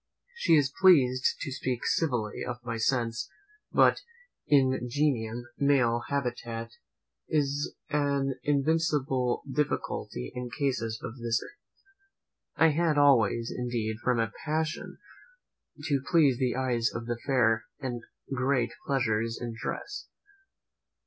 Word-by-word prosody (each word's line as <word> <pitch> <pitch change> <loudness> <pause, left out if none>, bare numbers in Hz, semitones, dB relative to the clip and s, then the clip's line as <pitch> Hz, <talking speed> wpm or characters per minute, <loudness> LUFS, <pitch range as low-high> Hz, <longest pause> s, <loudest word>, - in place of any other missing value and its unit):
She 470 - +3
is 135 -3 +2
pleased 130 -9 +5
to 140 - -4
speak 130 -2 -3
civilly 125 -10 0
of 120 -1 -4
my 115 -2 -3
sense, 115 0 0 0.4
but - - +5 0.5
Ingenium 130 -3 +1
male 125 -4 +3
habitat 120 -4 -3 0.6
is 145 -1 0 0.2
an 140 -2 +1
invincible 140 -4 +1
difficulty 135 - -2
in 125 0 -5
cases 115 -3 -2
of 120 +3 -7
this 115 0 +1
nature. - - -11 1.0
I 160 - +5
had 160 0 +1
always, 120 -5 +4
indeed, 120 -3 -2
from 125 -2 +2
a 115 0 0
passion 155 0 -2 0.9
to 140 -3 +1
please 145 -7 +4
the 125 -3 +1
eyes 125 -3 +1
of 115 - -5
the 120 0 -3
fair, 115 -4 +3 0.2
a 120 -2 -2 0.3
great 130 -2 +1 0.2
pleasure 120 -6 +1
in 115 +1 -4
dress. 130 - -5
130 Hz, 115 wpm, -29 LUFS, 115-140 Hz, 1.0 s, pleased